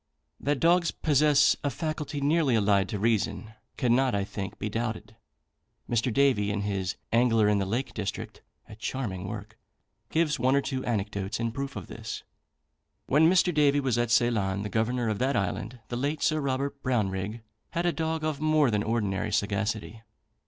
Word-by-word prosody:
That 145 Hz, -1 st, 0 dB
dogs 170 Hz, +3 st, +4 dB
possess 150 Hz, 0 st, +4 dB
a 145 Hz, -, +1 dB
faculty 150 Hz, +1 st, -4 dB
nearly 145 Hz, -3 st, +3 dB
allied 100 Hz, -3 st, +3 dB
to 105 Hz, -, -2 dB
reason 110 Hz, 0 st, 0 dB, 0.2 s
cannot, 125 Hz, -1 st, +2 dB
I 100 Hz, -, 0 dB
think, 100 Hz, 0 st, -6 dB
be -, -, -3 dB
doubted. 110 Hz, 0 st, -4 dB, 0.7 s
Mr. 120 Hz, +1 st, +1 dB
Davy, 125 Hz, -6 st, +3 dB
in 105 Hz, 0 st, -1 dB
his 100 Hz, -2 st, -2 dB, 0.2 s
"Angler 115 Hz, -2 st, +4 dB
in 105 Hz, -1 st, +3 dB
the 95 Hz, -, -1 dB
Lake 120 Hz, +7 st, -2 dB
District," 100 Hz, -3 st, -5 dB, 0.3 s
(a -, -, -11 dB
charming 105 Hz, -5 st, -4 dB
work), 110 Hz, +1 st, -8 dB, 0.5 s
gives 155 Hz, -3 st, +1 dB
one 130 Hz, +3 st, +3 dB
or 140 Hz, -, +3 dB
two 130 Hz, -1 st, -3 dB
anecdotes 105 Hz, -2 st, -2 dB
in 115 Hz, -1 st, -1 dB
proof 140 Hz, +3 st, -5 dB
of -, -, -6 dB
this. -, -, -7 dB, 0.8 s
When 155 Hz, +4 st, +5 dB
Mr. 180 Hz, -1 st, +3 dB
Davy 145 Hz, -1 st, +4 dB
was 130 Hz, -4 st, 0 dB
at 120 Hz, -1 st, +1 dB
Ceylon, 110 Hz, -5 st, +2 dB
the 105 Hz, -, -4 dB
Governor 115 Hz, +3 st, 0 dB
of 110 Hz, -2 st, -1 dB
that 135 Hz, +2 st, +1 dB
Island, 105 Hz, +5 st, -2 dB
the 120 Hz, -, -3 dB
late 145 Hz, +4 st, -1 dB
Sir 155 Hz, -, +2 dB
Robert 140 Hz, +1 st, -2 dB
Brownrigg, 105 Hz, -3 st, -1 dB, 0.3 s
had 170 Hz, 0 st, -2 dB
a 175 Hz, -, +2 dB
dog 160 Hz, -1 st, -2 dB
of 155 Hz, -2 st, -2 dB
more 155 Hz, -4 st, +3 dB
than 105 Hz, -1 st, +1 dB
ordinary 105 Hz, -2 st, -1 dB
sagacity. 110 Hz, +1 st, -1 dB
120 Hz, 175 wpm, -28 LUFS, 105-140 Hz, 0.8 s, When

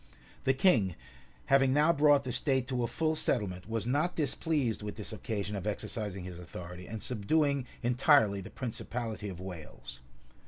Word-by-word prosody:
[*] -, -, -25 dB
The 135 Hz, -, +3 dB
king, 115 Hz, -, +3 dB, 0.5 s
having 135 Hz, -1 st, +4 dB
now 150 Hz, +4 st, +5 dB
brought 145 Hz, -2 st, +5 dB
the 130 Hz, -, -3 dB
state 130 Hz, 0 st, +1 dB
to 125 Hz, -2 st, 0 dB
a -, -, +1 dB
full 160 Hz, +3 st, 0 dB
settlement, 100 Hz, -10 st, -1 dB
was 110 Hz, -2 st, -1 dB
not 145 Hz, +8 st, +1 dB
displeased 145 Hz, -5 st, 0 dB
with 105 Hz, 0 st, -5 dB
this 110 Hz, 0 st, -5 dB
occasion 105 Hz, -1 st, -3 dB
of 100 Hz, +1 st, -4 dB
exercising 105 Hz, -2 st, -3 dB
his 90 Hz, -1 st, -7 dB
authority, 90 Hz, +1 st, -8 dB
and 110 Hz, 0 st, -6 dB
subduing 140 Hz, +4 st, +1 dB, 0.2 s
entirely 120 Hz, -4 st, +4 dB
the 95 Hz, -, -9 dB
principality 115 Hz, -3 st, -4 dB
of 90 Hz, -3 st, -8 dB
Wales. 90 Hz, -8 st, -8 dB
115 Hz, 165 wpm, -31 LUFS, 100-140 Hz, 0.5 s, now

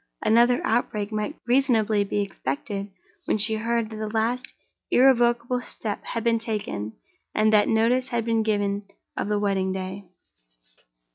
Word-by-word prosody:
Another 240 Hz, +2 st, +4 dB
outbreak 215 Hz, -2 st, 0 dB
might 215 Hz, +7 st, -2 dB
reasonably 230 Hz, -5 st, +3 dB
be 205 Hz, +1 st, -1 dB
expected 195 Hz, +2 st, -4 dB, 0.4 s
when -, -, +1 dB
she 220 Hz, +1 st, +1 dB
heard 230 Hz, 0 st, -1 dB
that 220 Hz, -, -6 dB
the 215 Hz, 0 st, -3 dB
last 230 Hz, +4 st, -1 dB, 0.4 s
irrevocable 240 Hz, -1 st, +3 dB
step 215 Hz, -4 st, -5 dB
had 230 Hz, -, -4 dB
been 230 Hz, -1 st, +2 dB
taken, 210 Hz, -, -4 dB, 0.4 s
and 215 Hz, 0 st, +3 dB
that 210 Hz, -1 st, +5 dB
notice 235 Hz, +3 st, +2 dB
had 235 Hz, -2 st, -2 dB
been 225 Hz, -1 st, +2 dB
given 205 Hz, -2 st, -1 dB, 0.3 s
of -, -, -2 dB
the 210 Hz, 0 st, +1 dB
wedding 195 Hz, -2 st, 0 dB
day. 190 Hz, 0 st, -5 dB
220 Hz, 145 wpm, -25 LUFS, 205-235 Hz, 0.4 s, that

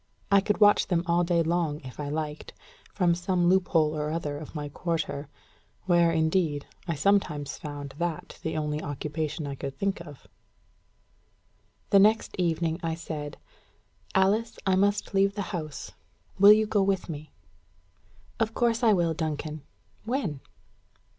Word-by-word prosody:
I 200 Hz, 0 st, +6 dB
could 210 Hz, +1 st, 0 dB
watch 205 Hz, -1 st, +5 dB
them 175 Hz, -2 st, +1 dB
all 170 Hz, 0 st, +2 dB
day 170 Hz, -1 st, +2 dB
long, 165 Hz, -3 st, 0 dB
if 130 Hz, 0 st, -11 dB
I 145 Hz, -1 st, -3 dB
liked, 150 Hz, 0 st, -4 dB, 0.4 s
from 180 Hz, -3 st, +2 dB
some 175 Hz, 0 st, 0 dB
loophole 170 Hz, -4 st, +3 dB
or 150 Hz, 0 st, -2 dB
other 155 Hz, -2 st, -3 dB
of 155 Hz, +2 st, -10 dB
my 150 Hz, -1 st, -3 dB
quarter; 155 Hz, -2 st, -3 dB, 0.6 s
where, 175 Hz, -2 st, +4 dB
indeed, 160 Hz, -2 st, +1 dB, 0.2 s
I 170 Hz, -, -1 dB
sometimes 150 Hz, -3 st, +1 dB
found 145 Hz, -2 st, -7 dB
that 170 Hz, -2 st, -4 dB
the 160 Hz, -, -3 dB
only 150 Hz, 0 st, -2 dB
occupation 150 Hz, +1 st, -3 dB
I 140 Hz, -, -4 dB
could 135 Hz, 0 st, -6 dB
think 195 Hz, -2 st, -1 dB
of. 145 Hz, -5 st, -12 dB, 1.7 s
The 200 Hz, -, +7 dB
next 215 Hz, +3 st, +3 dB
evening 165 Hz, -1 st, 0 dB
I 165 Hz, -2 st, -2 dB
said, 155 Hz, -3 st, -6 dB, 0.8 s
"Alice, 205 Hz, +4 st, +2 dB
I 190 Hz, -1 st, +3 dB
must 205 Hz, +2 st, +1 dB
leave 195 Hz, 0 st, +3 dB
the 205 Hz, -, -2 dB
house: 155 Hz, -5 st, -5 dB, 0.5 s
will 200 Hz, +1 st, +10 dB
you 215 Hz, +1 st, +5 dB
go 210 Hz, -1 st, +1 dB
with 195 Hz, -1 st, 0 dB
me?" 155 Hz, -2 st, -7 dB, 1.1 s
"Of 225 Hz, 0 st, 0 dB
course 235 Hz, 0 st, +1 dB
I 225 Hz, -3 st, +5 dB
will, 170 Hz, -3 st, +2 dB
Duncan. 155 Hz, -1 st, -3 dB, 0.4 s
When?" 220 Hz, -, -2 dB
170 Hz, 150 wpm, -27 LUFS, 150-195 Hz, 1.7 s, will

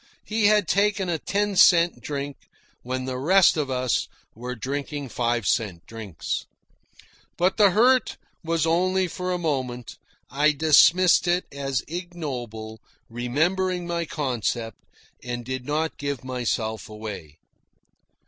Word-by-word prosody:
He 215 Hz, -1 st, +2 dB
had 210 Hz, -4 st, +3 dB
taken 200 Hz, 0 st, +1 dB
a 165 Hz, -2 st, -1 dB
ten 205 Hz, +3 st, -1 dB
cent 175 Hz, -2 st, +5 dB
drink 140 Hz, -1 st, -4 dB, 0.5 s
when 130 Hz, +1 st, -4 dB
the 130 Hz, -1 st, -4 dB
rest 185 Hz, +7 st, +5 dB
of 150 Hz, -4 st, -1 dB
us 130 Hz, -1 st, 0 dB, 0.3 s
were 125 Hz, +3 st, -6 dB
drinking 140 Hz, +3 st, -4 dB
five 120 Hz, -2 st, -1 dB
cent 100 Hz, -8 st, -1 dB
drinks! 110 Hz, -6 st, -5 dB, 0.9 s
But 180 Hz, +2 st, +1 dB
the 205 Hz, -2 st, +6 dB
hurt 245 Hz, +7 st, +3 dB, 0.3 s
was 165 Hz, -1 st, 0 dB
only 185 Hz, +3 st, +2 dB
for 180 Hz, +1 st, -4 dB
a 180 Hz, -, 0 dB
moment. 130 Hz, -8 st, -3 dB, 0.3 s
I 150 Hz, +2 st, +3 dB
dismissed 165 Hz, +4 st, +5 dB
it 175 Hz, +1 st, +1 dB
as 135 Hz, -2 st, -2 dB
ignoble, 130 Hz, -, -6 dB, 0.3 s
remembered 175 Hz, +10 st, 0 dB
my 170 Hz, -1 st, -2 dB
concept, 120 Hz, -7 st, -3 dB, 0.4 s
and 120 Hz, -1 st, -5 dB
did 130 Hz, 0 st, -5 dB
not 155 Hz, +2 st, -1 dB
give 140 Hz, -3 st, -3 dB
myself 120 Hz, -4 st, -3 dB
away. 105 Hz, -8 st, -8 dB
145 Hz, 130 wpm, -24 LUFS, 120-175 Hz, 0.9 s, the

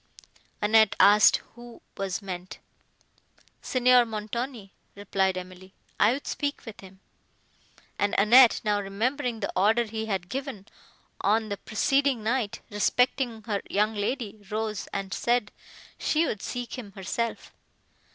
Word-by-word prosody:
Annette 220 Hz, 0 st, +4 dB
asked 210 Hz, +1 st, +6 dB
who 240 Hz, 0 st, -13 dB, 0.2 s
was 195 Hz, +1 st, -3 dB
meant. 185 Hz, -1 st, -7 dB, 1.0 s
"Signor 250 Hz, -1 st, +4 dB
Montoni," 225 Hz, 0 st, -5 dB, 0.2 s
replied 190 Hz, -2 st, 0 dB
Emily. 185 Hz, +1 st, -10 dB, 0.3 s
"I 210 Hz, -, +5 dB
would 280 Hz, -, -6 dB
speak 285 Hz, -1 st, -3 dB
with 225 Hz, -3 st, -10 dB
him;" 190 Hz, 0 st, -14 dB, 1.0 s
and 205 Hz, -, +1 dB
Annette, 235 Hz, +4 st, +6 dB
now 205 Hz, -1 st, +1 dB
remembering 230 Hz, +4 st, -2 dB
the 200 Hz, -, -3 dB
order 215 Hz, +5 st, +3 dB
he 220 Hz, 0 st, -5 dB
had 190 Hz, -4 st, -2 dB
given, 260 Hz, -4 st, -5 dB, 0.6 s
on 215 Hz, +2 st, +1 dB
the 200 Hz, -, -3 dB
preceding 270 Hz, +3 st, 0 dB
night, 225 Hz, -1 st, -1 dB
respecting 235 Hz, +2 st, 0 dB
her 205 Hz, -2 st, -2 dB
young 210 Hz, +2 st, +1 dB
lady, 215 Hz, 0 st, -3 dB
rose, 215 Hz, -1 st, -3 dB
and 195 Hz, -1 st, -4 dB
said 240 Hz, -1 st, 0 dB, 0.5 s
she 320 Hz, +2 st, +1 dB
would 215 Hz, -, -3 dB
seek 245 Hz, +1 st, -5 dB
him 205 Hz, -5 st, -10 dB
herself. 215 Hz, +4 st, -4 dB
215 Hz, 130 wpm, -27 LUFS, 200-240 Hz, 1.0 s, asked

